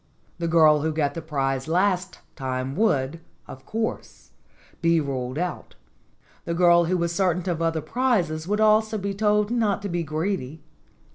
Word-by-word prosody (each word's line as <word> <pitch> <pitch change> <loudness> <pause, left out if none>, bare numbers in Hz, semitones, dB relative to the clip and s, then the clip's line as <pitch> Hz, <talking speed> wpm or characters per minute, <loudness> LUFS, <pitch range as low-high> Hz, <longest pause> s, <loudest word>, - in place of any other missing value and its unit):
The 170 - -1
girl 155 -3 +5
who 160 +1 0
got 150 -2 0
the 165 - -5
prize 135 -3 -2
last 185 +2 0
time 130 0 -3
would, 155 -7 +1 0.3
of 130 - -12
course, 225 0 -5 0.5
be 165 -1 +3
ruled 130 -3 -3
out. 180 +1 -4 0.7
The 170 - -2
girl 175 -1 +5
who 180 +2 0
was 170 0 -1
certain 180 -1 0
of 170 -2 -1
other 165 -1 0
prizes 180 - 0
would 210 +2 0
also 215 0 +3
be 200 0 -3
told 210 +1 +1
not 215 -4 0
to 200 - -3
be 175 -1 -1
greedy. 155 -2 -3
170 Hz, 160 wpm, -24 LUFS, 155-200 Hz, 0.7 s, girl